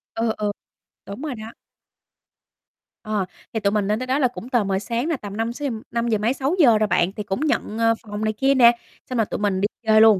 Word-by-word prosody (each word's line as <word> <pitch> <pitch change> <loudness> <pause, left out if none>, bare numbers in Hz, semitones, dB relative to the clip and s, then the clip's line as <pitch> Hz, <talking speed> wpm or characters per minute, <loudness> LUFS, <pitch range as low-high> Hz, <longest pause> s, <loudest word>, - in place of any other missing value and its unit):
Ừ, 225 0 +1
ừ, 210 -1 0 0.6
đúng 200 +7 -7
rồi 300 -5 -3
đó. 220 0 -8 1.5
Ờ, 215 -3 -1 0.3
thì 220 - 0
tụi 200 -1 +1
mình 210 -2 0
lên 210 +1 +1
tới 255 - -4
đó 265 +2 +1
là 265 - +4
cũng 245 0 -9
tờ 240 -4 +2
mờ 195 -1 0
sáng 235 +7 -2
nè, 325 -4 0
tầm 205 -1 -8
5-6 235 +6 -2
gi - - -3 0.2
năm 235 0 -1
giờ 220 -2 +2
mấy, 220 +4 +1
6 275 +5 -1
giờ 235 -8 +7
rồi 215 0 +2
bạn. 175 -2 +2
Thì 210 - -5
cũng 195 +1 -3
nhận, 295 -7 -1
ờ, 230 0 +4
phòng 210 -1 -5
này 215 - +1
kia 270 +5 +2
nè. 240 -2 +8 0.4
Xong 250 - -2
rồi 225 - +3
tụi - - -4
mình 200 -2 0
đi 205 - +3 0.2
chơi 215 0 +6
luôn. 220 -3 +7
225 Hz, 255 wpm, -23 LUFS, 210-250 Hz, 1.5 s, nè